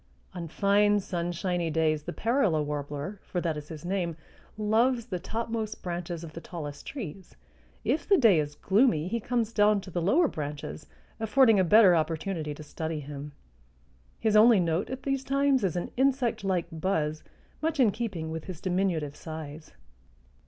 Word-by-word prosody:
On 175 -2 -5
fine 205 +4 +3
sunshiny 175 -1 -2
days 155 -1 +1
the 170 - -6
parula 210 - +1
warbler, 145 +5 -4
for 180 - -3
that 165 -3 -1
is 150 0 -7
his 160 0 -9
name, 175 -3 -2 0.4
loves 230 +3 +2
the 185 -7 -4
topmost 225 +2 -4
branches 175 -1 -4
of 160 -2 -9
the 165 - -7
tallest 150 -5 -7
trees; 195 - -7 0.5
if 290 - -1
the 395 - +6
day 220 - +5
is 145 -1 -3
gloomy 190 - +2
he 235 +5 -1
comes 230 -1 -1
down 210 -1 +4
to 185 - -11
the 175 - -1
lower 290 - +4
branches, 150 - -6 0.3
affording 225 -1 +4
a - - +5
better 195 0 +7
opportunity 160 -1 -2
to 155 - -9
study 160 +1 -4
him. 145 0 -8 0.9
His 220 -1 +1
only 220 0 +7
note 170 +1 0
at 260 0 -6
these 275 -1 -1
times 275 -1 +2
is 185 -2 0
an 175 - -3
insect 260 -4 +1
like 185 -3 0
buzz 155 -2 -1 0.4
much 315 -1 -1
in 235 -6 +5
keeping 190 -9 -4
with 160 -1 -5
his 185 -4 -7
diminutive 180 -6 -1
size. 155 -1 -8
180 Hz, 165 wpm, -28 LUFS, 160-220 Hz, 0.9 s, better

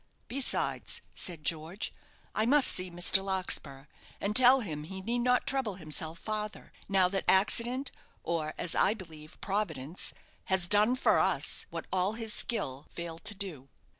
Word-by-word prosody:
"Besides," 270 +1 -1
said 170 -4 -2
George, 165 +5 -3 0.4
"I 215 +1 +1
must 285 +1 +5
see 185 0 +1
Mr. 175 +2 +4
Larkspur, 175 -8 -2 0.3
and 210 +1 -2
tell 255 +2 +8
him 155 -8 -5
he 190 +3 -7
need 235 +6 -2
not 250 +1 +2
trouble 265 -8 -2
himself 160 -1 -4
farther; 215 0 -5 0.2
now 190 -2 +4
that 195 0 -2
accident, 235 +7 +2 0.3
or, 160 -2 -2
as 170 - 0
I 205 - +3
believe 160 -6 -11
Providence, 190 -7 -1 0.3
has 190 -2 +2
done 210 +6 +5
for 255 - +3
us - - +1
what - - -6
all 190 +2 +1
his 225 -1 -4
skill 140 - -1
failed 170 -1 -7
to 205 - 0
do." 170 -10 -7
190 Hz, 155 wpm, -30 LUFS, 165-220 Hz, 0.4 s, tell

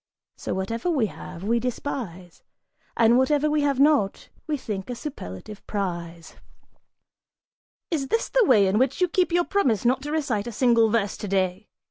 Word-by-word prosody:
So - - -4
whatever 225 - -2
we 280 -9 +2
have, 180 -3 -9
we 230 +3 +1
despise, 225 -8 -5 0.6
And 235 +2 +5
whatever 295 +3 +2
we 300 0 +2
have 280 -2 +1
not, 280 -9 +2 0.2
we 305 -2 -1
think 210 -5 -5
a 245 - -3
superlative 210 - -8
prize!" 170 -4 -5 1.5
"Is 285 -5 -1
this 455 +11 0
the - - +3
way 215 - +5
in 195 +3 +2
which 260 +1 +1
you 365 - +3
keep 360 0 +1
your 345 0 +2
promise 250 - +1
not 255 +2 +2
to 295 +2 -5
recite 245 -9 -1
a - - -4
single 230 -1 +3
verse 210 -3 0
today?" 190 0 -1
235 Hz, 165 wpm, -25 LUFS, 195-290 Hz, 1.5 s, And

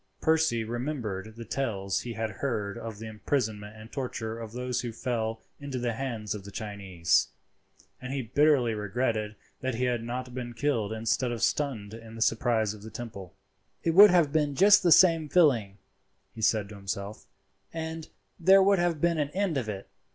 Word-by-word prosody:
Percy 160 -8 +2
remembered 110 -4 -4
the 115 0 -8
tales 105 -6 -2
he 120 - -6
had 110 -1 -3
heard 105 -7 -2
of 110 -2 -7
the 110 - -8
imprisonment 110 -2 -2
and 110 +1 -12
torture 115 -4 -4
of 115 -2 -7
those 125 +1 -2
who 120 - -4
fell 115 -2 -3 0.2
into 140 -2 -5
the 120 -1 -1
hands 115 -4 -3
of 105 -2 -7
the 100 - -9
Chinese, 100 -5 0 0.7
and 125 - -6
he 135 -1 -2
bitterly 130 -1 +3
regretted 110 0 -2 0.2
that 130 -2 -2
he 125 - -2
had 120 -2 0
not 125 +1 -5
been 120 -2 -6
killed 115 -7 0
instead 115 +3 0
of 120 - -3
stunned 115 -8 -1
in 115 0 -10
the 115 - -8
surprise 115 -2 +1
of 105 - -12
the 110 - -9
temple. 100 -5 -8 0.5
"It 165 - +2
would 200 +5 +9
have 170 -6 +3
been 150 -3 +1
just 205 +5 +7
the 175 - +3
same 165 -4 +6
feeling," 120 - +3 0.6
he 110 - -9
said 110 -1 +2
to 105 - -9
himself, 100 +1 -6 0.4
"and 160 -1 -5 0.3
there 190 +3 +6
would 200 -1 +4
have 170 -3 0
been 170 -2 +2
an 145 -1 0
end 195 -4 0
of 125 -5 -2
it. 100 -2 -6
120 Hz, 185 wpm, -28 LUFS, 110-140 Hz, 0.7 s, would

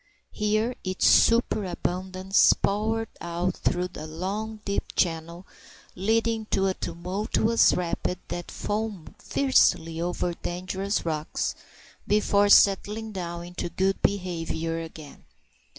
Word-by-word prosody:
Here 215 +3 0
its 185 0 -1
superabundance 190 -4 +3
poured 220 +2 -1
out 175 +1 -2
through 180 0 -1
a 155 - -7
long 200 +7 -4
deep 200 - -3
channel 170 +1 -1 0.5
leading 225 +3 0
to 195 - +1
a 190 - +2
tumultuous 205 +7 +1
rapid 180 +1 -2
that 175 -1 -5
foamed 210 -5 -4
fiercely 165 -11 +2
over 175 0 -1
dangerous 185 +4 -3
rocks 155 -2 -2 0.5
before 205 -1 +3
settling 210 +3 +4
down 175 -3 -5
into 175 0 -5
good 190 +3 0
behaviour 165 -4 -1
again. 160 -3 -10
185 Hz, 105 wpm, -26 LUFS, 170-210 Hz, 0.5 s, settling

